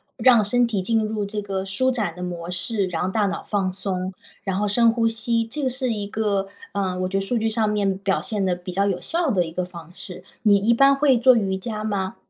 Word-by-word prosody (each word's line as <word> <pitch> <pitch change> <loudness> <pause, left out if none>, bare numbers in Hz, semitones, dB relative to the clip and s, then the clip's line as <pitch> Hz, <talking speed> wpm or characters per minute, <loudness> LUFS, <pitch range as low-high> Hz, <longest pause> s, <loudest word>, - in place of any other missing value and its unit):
让 245 -4 +5
身 245 +4 +3
体 220 -5 -1
进 225 +4 +1
入 215 -1 -2
这 210 +1 -4
个 195 -1 -3
舒 260 +7 +1
展 210 -9 -2
的 180 - -7
模 175 -1 -5
式， 185 +3 -1
然 175 -3 -2
后 185 - 0
大 210 +2 +1
脑 200 0 -3
放 195 -3 -1
松， 185 -1 -2 0.3
然 190 -2 -1
后 210 - 0
深 230 +3 +4
呼 230 -1 0
吸， 225 +1 0
这 260 +7 -3
个 265 - +1
是 255 -1 -2
一 205 -2 -3
个， 205 -2 -1 0.2
嗯， 185 -2 -2
我 185 - -1
觉 195 - -1
得 - - 0
数 215 +5 -1
据 225 0 0
上 220 -1 +1
面 200 -2 0
表 195 0 0
现 210 -5 -1
得 180 -1 +1
比 180 +1 -8
较 195 +2 +1
有 185 -3 -1
效 335 -1 0
的 190 -7 +2
一 165 - -7
个 180 +2 -2
方 170 -2 -11
式。 180 0 -10 0.2
你 210 -3 +6
一 205 +4 +3
般 275 +3 +5
会 275 -2 +3
做 250 +2 +6
瑜 195 -4 0
伽 215 +2 -5
吗？ 195 -3 -2
205 Hz, 275 characters per minute, -23 LUFS, 190-230 Hz, 0.3 s, 你